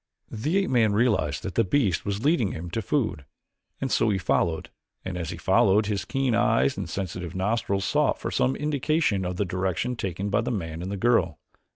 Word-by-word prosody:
The 150 - -1
ape 195 -6 +1
man 115 -5 +3
realized 95 - +1
that 95 - -4
the - - +3
beast 95 - +1
was 100 +5 -2
leading 145 - +2
him 85 +1 -6
to 115 - -1
food, 110 - -1 0.6
and 135 -2 -2
so 115 - +3
he 100 - +1
followed 85 -3 0 0.3
and 95 -1 -4
as 85 -3 -4
he - - -5
followed 105 +3 +3
his 100 -2 -2
keen 135 -3 0
eyes 65 - +2
and - - -5
sensitive 90 -3 -5
nostrils 100 0 0
sought - - +2
for - - -4
some 130 - +1
indication 150 - 0
of 90 0 -3
the 100 - 0
direction 95 +6 -1
taken 95 -2 -3
by 105 - +2
the 115 - -3
man 80 -7 -4
and 95 +2 -4
the 100 - -3
girl. 115 -7 +2
100 Hz, 205 wpm, -26 LUFS, 90-120 Hz, 0.6 s, man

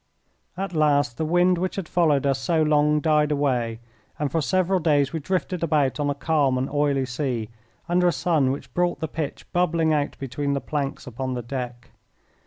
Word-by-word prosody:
At 195 -1 -3
last 145 -6 +2
the 160 - -1
wind 175 +2 +3
which 185 +1 -2
had 195 -4 -4
followed 155 -6 +2
us 135 -1 +1
so 160 +3 +1
long 150 0 +3
died 150 -1 +2
away, 125 -6 0 0.4
and 145 -2 -2
for 165 - +1
several 185 +3 +1
days 145 -4 +2
we 160 - -1
drifted 180 +2 -2
about 150 -4 +1
on 145 -1 0
a 140 - -1
calm 145 -3 +1
and 130 +1 -1
oily 145 -2 +1
sea, 120 -3 -3 0.4
under 180 +1 +3
a - - +4
sun 155 -6 +1
which 140 - -6
brought 175 -4 0
the 160 - -2
pitch 155 -1 -5
bubbling 170 -3 +2
out 145 -1 -1
between 140 +2 -2
the 140 - 0
planks 140 -1 -3
upon 130 +1 -4
the 120 - -4
deck. 120 -1 -6
150 Hz, 195 wpm, -24 LUFS, 135-165 Hz, 0.4 s, a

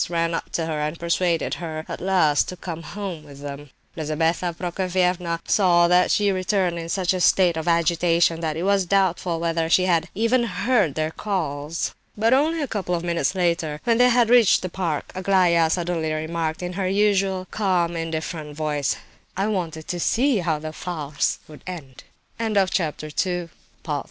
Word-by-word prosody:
ran 165 -1 0
up - - -3
to 165 - -1
her 155 -2 -2
and 150 +2 -2
persuaded 170 0 0
her, 160 -2 -6
at - - -6
last, 175 -6 +2
to 180 - -7
come 170 -2 -6
home 185 -4 -6
with 140 -2 -13
them. 145 0 -7 0.3
Lizabetha 165 +2 0
Prokofievna 180 -1 -1
saw 175 -4 +4
that 180 +1 +4
she 205 -1 +3
returned 185 -2 0
in 165 0 -6
such 185 0 +1
a 185 - -2
state 180 -2 +4
of 160 +1 -4
agitation 170 0 +2
that 160 -2 -2
it 165 - -2
was 195 -1 +2
doubtful 180 -3 +1
whether 165 -1 0
she 185 - +4
had 170 -3 +1
even 235 +3 +2
heard 200 - +1
their 155 0 -1
calls. 160 -6 -3 0.2
But 225 +3 +3
only 310 +4 +2
a - - -2
couple 190 -6 -2
of 170 - -3
minutes 170 -1 0
later, 170 -4 0
when 230 0 +2
they 250 0 +6
had 240 -2 +3
reached 240 -7 +5
the 185 - -3
park, 170 -4 -3
Aglaya 180 -3 +3
suddenly 170 -2 -1
remarked, 160 +2 -2
in 180 0 -4
her 190 0 -1
usual 195 -1 +1
calm, 180 -5 +1
indifferent 160 -2 -4
voice: 150 -3 0 0.4
"I 195 - +1
wanted 165 -6 -3
to 175 - -2
see 250 +5 +2
how 165 -3 0
the 155 +1 -7
farce 155 -4 -2
would 150 - -13
end." 150 -8 -8 0.3
III. 225 -1 -1
The 175 -1 0 0.4
occurrence 150 -3 -1
175 Hz, 175 wpm, -23 LUFS, 160-190 Hz, 0.4 s, they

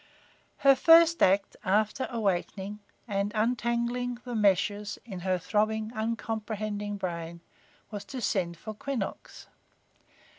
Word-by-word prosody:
Her 275 - +9
first 330 +4 +6
act 195 +2 +3
after 215 +6 +1
awakening 200 -2 -2 0.3
and 200 -1 -1
untangling 235 +2 0
the 245 - -5
meshes 205 -1 +1
in 195 -6 -7
her 185 +1 0
throbbing, 215 +4 0
uncomprehending 215 -2 -3
brain, 170 -2 -5 0.5
was 205 -2 -5
to 265 - -6
send 180 -7 -1
for 215 +6 -7
Quinnox. 235 -2 -5
215 Hz, 110 wpm, -29 LUFS, 195-235 Hz, 0.5 s, Her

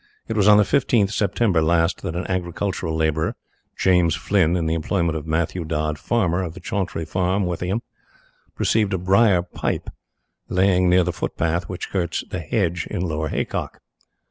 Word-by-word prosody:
It 110 - -3
was 105 -2 +3
on 105 -1 +8
the 105 - +6
15th 105 -2 +2
September 100 -3 +1
last 85 +2 +2
that 80 - -4
an 85 - -3
agricultural 90 -1 -2
labourer, 80 0 0 0.4
James 90 -4 +3
Flynn, 85 0 +2
in 85 -2 0
the 80 - 0
employment 85 0 0
of 80 0 -5
Mathew 85 +2 -1
Dodd, 75 -1 -2
farmer, 95 -7 +1
of 85 -3 -5
the - - -8
Chauntry 95 -4 -3
Farm, 95 +4 0
Withyham, 90 +5 -2 0.7
perceived 105 -3 +1
a - - 0
briar 95 0 +3
pipe 90 - -3 0.6
lying 90 -1 +3
near 90 +1 +5
the 90 0 -2
footpath 85 +1 -2
which 90 -1 -6
skirts 90 -4 -2
the 90 - -4
hedge 85 +1 -1
in 100 - -3
Lower 80 -3 -2
Haycock. - - -3
90 Hz, 170 wpm, -22 LUFS, 80-95 Hz, 0.7 s, on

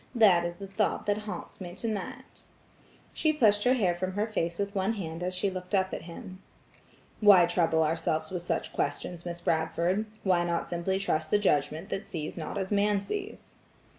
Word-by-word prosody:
That 190 -7 +6
is 175 - -6
the 200 - -8
thought 195 +2 -1
that 210 +1 0
haunts 205 - -7
me 175 -1 -7
tonight." 215 0 -5 0.7
She 310 - +2
pushed 215 -8 +3
her 250 +1 +5
hair 190 -8 +2
from 185 +2 -3
her 205 +2 0
face 170 -6 -2
with 200 0 -2
one 195 +3 +1
hand 165 -5 -5
as 180 +1 -2
she 195 +2 0
looked 185 +2 -3
up 190 -1 +1
at - - -3
him. 185 +3 -10 0.8
"Why 200 -5 +8
trouble 165 -2 +2
ourselves 160 0 -1
with 180 -2 -3
such 175 - -2
questions, 175 -1 -3
Miss 170 0 -5
Bradford? 170 +5 0 0.2
Why 180 -3 +3
not 170 -1 -1
simply 175 +2 -1
trust 160 -5 -1
the 210 - +4
judgment 160 -1 +1
that 195 - -4
sees 155 -4 -4
not 165 +2 -5
as 190 0 -3
man 205 0 +3
sees?" 395 - -6
185 Hz, 190 wpm, -29 LUFS, 170-205 Hz, 0.8 s, Why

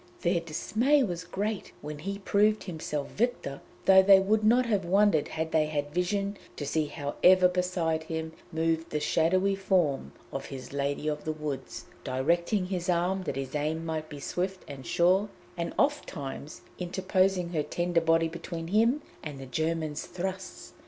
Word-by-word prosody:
Their 175 0 +2
dismay 230 - +2
was 175 -6 -3
great 205 +3 -3
when 150 0 -6
he 195 +5 -4
proved 210 +2 +2
himself 155 -5 -4
victor, 215 - -1 0.2
though 190 0 +8
they 195 0 +8
would 210 +3 +2
not 240 +4 +5
have 205 -4 +1
wondered 190 -3 +3
had 160 0 -3
they 155 -1 +3
had 145 -1 -3
vision 200 +3 0 0.2
to 145 - -4
see 155 +1 0
how 145 -1 -5
ever 185 0 +8
beside 180 -3 -1
him 160 0 -4 0.2
moved 165 0 0
the 150 - -1
shadowy 185 +6 +2
form 175 - +1 0.2
of - - -4
his 135 0 -8
Lady 140 +1 -1
of 150 -1 -2
the 155 - -1
Woods, 150 -4 -5 0.2
directing 170 +9 +1
his 180 -1 -3
arm 180 +2 +1
that 140 - -2
his 135 -1 -4
aim 155 +2 -1
might 155 -1 -3
be 145 - -8
swift 185 +5 -3
and 135 -4 -8
sure, 185 +4 +3 0.3
and 170 -1 -3
oft 295 +1 +1
times 140 -1 -7 0.2
interposing 185 0 +1
her 165 -3 0
tender 175 +3 0
body 165 0 +3
between 165 0 -6
him 230 +8 +3 0.2
and 150 -3 -6
the 135 - -8
German's 155 +3 -2
thrusts. 185 +1 -5
170 Hz, 170 wpm, -29 LUFS, 155-190 Hz, 0.3 s, though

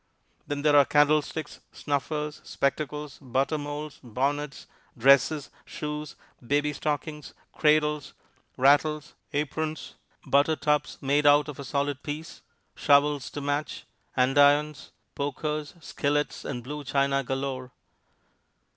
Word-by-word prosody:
Then 145 0 -3
there 150 -1 +4
are 145 - +8
candlesticks, 150 +1 +1
snuffers, 150 +1 -3
spectacles, 150 +1 -2
butter 135 +4 0
molds, 145 0 -6
bonnets, 135 +4 -2 0.3
dresses, 140 +4 +4
shoes, 150 0 -6 0.3
baby 145 +4 +1
stockings, 150 +1 -4 0.2
cradles, 150 -1 +2 0.4
rattles, 145 +3 +3 0.2
aprons, 155 +1 -3 0.3
butter 145 +3 +3
tubs 150 -1 0
made 145 +2 +2
out 145 +1 +6
of 145 - -8
a - - -5
solid 140 0 -2
piece, 155 +2 -7 0.3
shovels 145 -1 +3
to 145 - -6
match, 145 +1 -3 0.3
andirons, 145 +3 +3 0.2
pokers, 150 +2 -3
skillets 145 -1 -1
and 120 - -4
blue 150 +3 -6
china 140 0 +1
galore. 130 -1 -3
145 Hz, 110 wpm, -27 LUFS, 140-150 Hz, 0.4 s, are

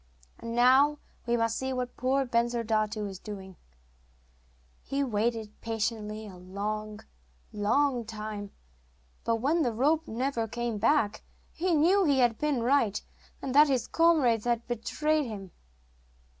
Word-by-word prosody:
And 230 0 -5
now 265 +5 +5 0.3
we 240 0 +2
must 230 0 0
see 265 0 -2
what 250 -1 -3
poor 265 +2 +1
Bensurdatu 230 -3 0
was 195 -2 -6
doing. 195 -3 -8 1.3
He 280 +1 -2
waited 225 -2 -1
patiently 220 -1 -3
a 190 -3 -10
long, 210 +3 -5 0.5
long 240 +4 +1
time, 210 -1 -6 0.8
but 230 - +2
when 285 +9 +1
the 250 -6 +1
rope 300 +8 +1
never 235 0 -1
came 235 -1 -3
back 225 -3 +2 0.3
he 350 0 0
knew 360 +6 +4
he 285 -3 +3
had 240 -3 +2
been 290 -6 0
right, 235 -5 +2 0.4
and 265 - -3
that 295 +2 +7
his 260 -4 +1
comrades 290 -10 +3
had 235 -1 0
betrayed 300 +5 0
him. 195 -5 -7
235 Hz, 135 wpm, -29 LUFS, 215-275 Hz, 1.3 s, that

